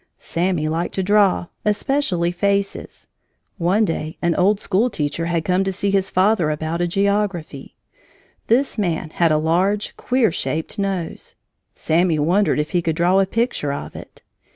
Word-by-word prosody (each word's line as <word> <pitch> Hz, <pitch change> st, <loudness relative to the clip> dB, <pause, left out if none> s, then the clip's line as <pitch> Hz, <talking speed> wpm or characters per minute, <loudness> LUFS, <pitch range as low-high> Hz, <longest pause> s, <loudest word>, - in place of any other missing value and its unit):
Sammy 170 Hz, -2 st, -1 dB
liked 165 Hz, +3 st, -2 dB
to 190 Hz, -, 0 dB
draw, 200 Hz, -2 st, +3 dB, 0.2 s
especially 210 Hz, -5 st, 0 dB
faces! 200 Hz, +2 st, -2 dB, 0.5 s
One 190 Hz, +6 st, +2 dB
day 160 Hz, -3 st, -4 dB
an 170 Hz, -1 st, +1 dB
old 195 Hz, +4 st, +2 dB
school 210 Hz, +6 st, +1 dB
teacher 150 Hz, -4 st, -2 dB
had 170 Hz, -1 st, -1 dB
come 185 Hz, +1 st, +2 dB
to 195 Hz, -, -1 dB
see 200 Hz, +1 st, -1 dB
his 195 Hz, -1 st, +1 dB
father 185 Hz, -3 st, +2 dB
about 160 Hz, +3 st, -2 dB
a 175 Hz, -, +1 dB
geography. 195 Hz, -6 st, -1 dB, 0.7 s
This 245 Hz, +1 st, +1 dB
man 165 Hz, -5 st, -1 dB
had 170 Hz, -1 st, +2 dB
a 155 Hz, -, +3 dB
large, 180 Hz, +7 st, 0 dB
queer 250 Hz, -5 st, +1 dB
shaped 160 Hz, +6 st, -3 dB
nose. 195 Hz, -4 st, -3 dB, 0.4 s
Sammy 165 Hz, 0 st, +1 dB
wondered 180 Hz, +7 st, +2 dB
if 150 Hz, -, -2 dB
he 175 Hz, -, +1 dB
could 165 Hz, -2 st, -1 dB
draw 180 Hz, +3 st, +3 dB
a 195 Hz, -, +2 dB
picture 230 Hz, -, -1 dB
of 140 Hz, -, -6 dB
it. -, -, -12 dB
180 Hz, 160 wpm, -20 LUFS, 165-200 Hz, 0.7 s, draw